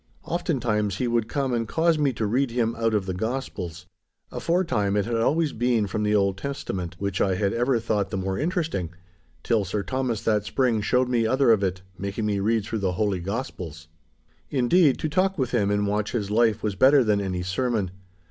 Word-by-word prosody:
Oftentimes 120 Hz, -, -1 dB
he 125 Hz, -, 0 dB
would 115 Hz, -2 st, 0 dB
come 135 Hz, -2 st, -1 dB
and 115 Hz, -2 st, -1 dB
cause 160 Hz, +4 st, +2 dB
me 145 Hz, -2 st, +2 dB
to 110 Hz, -, -2 dB
read 125 Hz, +6 st, +1 dB
to 115 Hz, -, -9 dB
him 115 Hz, -1 st, +1 dB
out 115 Hz, -1 st, 0 dB
of 100 Hz, -3 st, 0 dB
the 95 Hz, -, -3 dB
Gospels. 90 Hz, -5 st, -4 dB, 0.5 s
Aforetime 130 Hz, -, 0 dB
it 100 Hz, -, +1 dB
had 115 Hz, 0 st, -1 dB
always 150 Hz, +6 st, +1 dB
been 120 Hz, -2 st, +1 dB
from 105 Hz, +2 st, -3 dB
the 105 Hz, 0 st, +2 dB
Old 100 Hz, -1 st, +1 dB
Testament, 95 Hz, -10 st, -4 dB
which 100 Hz, -1 st, -2 dB
I 95 Hz, -2 st, +2 dB
had 100 Hz, +1 st, 0 dB
ever 120 Hz, +1 st, +1 dB
thought 105 Hz, -3 st, -1 dB
the 95 Hz, -, -3 dB
more 95 Hz, 0 st, -2 dB
interesting, 160 Hz, -, -1 dB, 0.5 s
till 115 Hz, -3 st, +2 dB
Sir 100 Hz, +2 st, -2 dB
Thomas 130 Hz, -4 st, -2 dB
that 105 Hz, -2 st, +2 dB
spring 120 Hz, -1 st, +1 dB
showed 125 Hz, +4 st, +2 dB
me 120 Hz, -3 st, +1 dB
other 130 Hz, 0 st, +4 dB
of 110 Hz, -3 st, +4 dB
it, 95 Hz, -1 st, -2 dB, 0.2 s
making 100 Hz, +3 st, -3 dB
me 105 Hz, -2 st, 0 dB
read 110 Hz, +1 st, +1 dB
through 110 Hz, -, -3 dB
the 95 Hz, -2 st, 0 dB
Holy 100 Hz, 0 st, 0 dB
Gospels. 85 Hz, -, -5 dB, 0.6 s
Indeed, 140 Hz, +3 st, +3 dB
to -, -, -2 dB
talk 185 Hz, +5 st, +1 dB
with 130 Hz, -4 st, -1 dB
him 105 Hz, -5 st, +1 dB
and 105 Hz, 0 st, +1 dB
watch 105 Hz, +1 st, -1 dB
his 105 Hz, -4 st, -2 dB
life 110 Hz, -1 st, +2 dB
was 105 Hz, -2 st, 0 dB
better 130 Hz, +7 st, +5 dB
than 105 Hz, -2 st, +2 dB
any 90 Hz, -2 st, -2 dB
sermon. 100 Hz, 0 st, -1 dB
110 Hz, 205 wpm, -25 LUFS, 100-130 Hz, 0.6 s, better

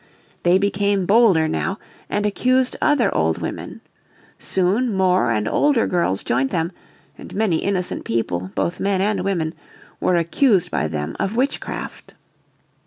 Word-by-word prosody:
They 175 Hz, +1 st, +4 dB
became 200 Hz, -1 st, 0 dB
bolder 195 Hz, -6 st, +4 dB
now 190 Hz, +5 st, -2 dB, 0.3 s
and 205 Hz, 0 st, -1 dB
accused 255 Hz, +5 st, +1 dB
other 290 Hz, -5 st, +2 dB
old 80 Hz, 0 st, +1 dB
women. -, -, -6 dB, 0.6 s
Soon 200 Hz, +7 st, +1 dB
more 185 Hz, -, +2 dB
and 105 Hz, -1 st, 0 dB
older 285 Hz, -6 st, +2 dB
girls 170 Hz, -, 0 dB
joined 130 Hz, +3 st, 0 dB
them, 165 Hz, +2 st, -1 dB, 0.5 s
and -, -, -10 dB
many 200 Hz, -6 st, +1 dB
innocent 185 Hz, 0 st, -2 dB
people, 95 Hz, -6 st, -2 dB
both 170 Hz, -, -1 dB
men 195 Hz, -1 st, 0 dB
and 195 Hz, -1 st, 0 dB
women, 170 Hz, -5 st, -1 dB, 0.5 s
were 180 Hz, -, +2 dB
accused 180 Hz, -, +2 dB
by 75 Hz, -, 0 dB
them 75 Hz, 0 st, -4 dB
of 200 Hz, +3 st, -1 dB
witchcraft. 265 Hz, +4 st, -3 dB
185 Hz, 140 wpm, -21 LUFS, 160-210 Hz, 0.6 s, They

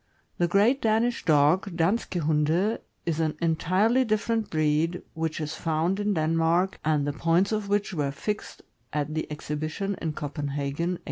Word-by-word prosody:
The 175 Hz, -, +3 dB
''Great 210 Hz, +9 st, +3 dB
Danish 225 Hz, +2 st, +1 dB
Dog" 160 Hz, +4 st, +3 dB
(Danske 180 Hz, +1 st, 0 dB
Hunde) 160 Hz, +7 st, +1 dB, 0.3 s
is 165 Hz, -2 st, -1 dB
an 155 Hz, -2 st, 0 dB
entirely 185 Hz, +9 st, +2 dB
different 220 Hz, -1 st, 0 dB
breed, 155 Hz, +1 st, +1 dB
which 160 Hz, -1 st, -2 dB
is 155 Hz, 0 st, -3 dB
found 165 Hz, +4 st, 0 dB
in 205 Hz, -1 st, 0 dB
Denmark, 165 Hz, +3 st, +1 dB
and 150 Hz, -2 st, +1 dB
the 145 Hz, -, -1 dB
points 170 Hz, +6 st, +2 dB
of 210 Hz, -2 st, -2 dB
which 205 Hz, 0 st, 0 dB
were 145 Hz, -5 st, 0 dB
fixed 210 Hz, +10 st, -5 dB, 0.3 s
at 150 Hz, 0 st, -2 dB
the 155 Hz, -1 st, -3 dB
exhibition 155 Hz, +6 st, -3 dB
in 160 Hz, -2 st, -2 dB
Copenhagen, 145 Hz, +3 st, -3 dB
1886. -, -, -26 dB
165 Hz, 155 wpm, -26 LUFS, 155-200 Hz, 0.3 s, The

